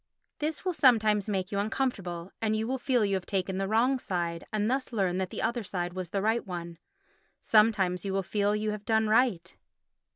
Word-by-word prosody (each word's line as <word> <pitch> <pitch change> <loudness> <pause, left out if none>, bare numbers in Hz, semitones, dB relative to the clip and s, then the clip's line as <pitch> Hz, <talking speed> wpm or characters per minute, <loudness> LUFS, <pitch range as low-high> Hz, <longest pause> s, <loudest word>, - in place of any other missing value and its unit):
This 305 +3 -3
will 365 - +1
sometimes 220 - +3
make 190 -2 -2
you 200 - -1
uncomfortable, 195 -6 -2
and 220 -1 +1
you 220 +1 -1
will 265 +1 -2
feel 245 -3 +2
you 200 - 0
have 190 -2 -2
taken 190 -1 -1
the 195 - -1
wrong 245 +5 +2
side 170 -5 -3
and 210 -1 0
thus 260 +2 -1
learn 190 -5 0
that 190 -1 -2
the - - -5
other 235 +2 0 0.3
was 185 -2 -5
the 195 +1 -2
right 225 +2 +1
one. 170 -3 -7 0.6
Sometimes 205 -5 +3
you 195 - -3
will 195 0 0
feel 205 +2 0
you 215 0 -1
have 210 -1 -6
done 220 0 +2
right. 215 -7 +2
210 Hz, 200 wpm, -29 LUFS, 185-225 Hz, 0.6 s, sometimes